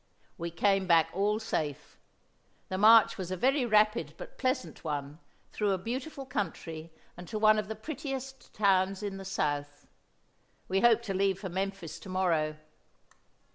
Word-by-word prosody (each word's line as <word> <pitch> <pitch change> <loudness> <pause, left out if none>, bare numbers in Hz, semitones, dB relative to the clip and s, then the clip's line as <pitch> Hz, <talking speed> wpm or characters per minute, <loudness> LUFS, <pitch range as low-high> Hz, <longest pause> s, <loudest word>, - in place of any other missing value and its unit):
We 170 0 -4
came 195 +3 +1
back 165 -3 +4
all 205 +3 +1
safe. 155 -10 -4 0.7
The 185 - -2
march 220 0 +6
was 185 -2 -4
a 185 - -3
very 260 - +2
rapid, 215 +1 +2
but - - -11
pleasant 255 0 -2
one, 145 -1 -4 0.3
through 205 -2 0
a - - 0
beautiful 260 - -5
country 165 - -4 0.2
and 175 0 -10
to 220 - -4
one 215 0 +5
of 210 - -4
the 220 - -4
prettiest 270 +1 -6
towns 195 -1 +2
in 200 -1 -4
the 195 - -8
South. 145 -6 -2 0.8
We 190 +1 +1
hope 235 -1 +5
to 200 -4 -3
leave 195 0 +1
for 195 -1 -6
Memphis 190 -2 -4
to 195 - -11
morrow." 165 -5 +1
195 Hz, 160 wpm, -30 LUFS, 175-220 Hz, 0.8 s, march